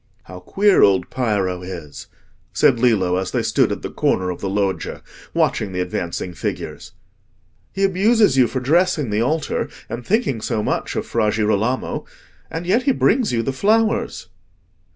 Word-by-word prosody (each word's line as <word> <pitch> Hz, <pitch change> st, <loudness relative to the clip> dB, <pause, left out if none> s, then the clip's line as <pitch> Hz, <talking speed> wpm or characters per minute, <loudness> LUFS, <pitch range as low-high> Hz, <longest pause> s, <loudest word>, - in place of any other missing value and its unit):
"How 90 Hz, 0 st, -10 dB
queer 200 Hz, -, +3 dB
old 95 Hz, -2 st, +3 dB
Piero 100 Hz, -8 st, -1 dB
is!" 85 Hz, -5 st, -8 dB, 0.5 s
said 120 Hz, -, +3 dB
Lillo 100 Hz, -7 st, +2 dB
as 95 Hz, 0 st, -2 dB
they -, -, -1 dB
stood -, -, +2 dB
at -, -, -4 dB
the -, -, -5 dB
corner 90 Hz, 0 st, 0 dB
of 90 Hz, -, -8 dB
the 100 Hz, -, -2 dB
loggia, 100 Hz, -1 st, -2 dB, 0.3 s
watching 100 Hz, -3 st, 0 dB
the 90 Hz, -, -3 dB
advancing 90 Hz, 0 st, -3 dB
figures. 80 Hz, -, -5 dB, 0.8 s
"He 195 Hz, -, -2 dB
abuses 200 Hz, -, +3 dB
you 130 Hz, -2 st, +5 dB
for 130 Hz, -, -3 dB
dressing 155 Hz, -, +2 dB
the 105 Hz, +2 st, +1 dB
altar, 155 Hz, +5 st, -1 dB, 0.2 s
and 120 Hz, -, -5 dB
thinking 185 Hz, -, 0 dB
so 110 Hz, -2 st, -1 dB
much -, -, -2 dB
of -, -, -2 dB
Fra 105 Hz, -, 0 dB
Girolamo, 110 Hz, +3 st, -1 dB, 0.4 s
and 165 Hz, +2 st, -5 dB
yet 205 Hz, +8 st, +2 dB
he 275 Hz, -, +2 dB
brings 250 Hz, -2 st, +2 dB
you 115 Hz, -1 st, 0 dB
the 135 Hz, -, -2 dB
flowers." 220 Hz, +8 st, +1 dB
115 Hz, 165 wpm, -20 LUFS, -, 0.8 s, you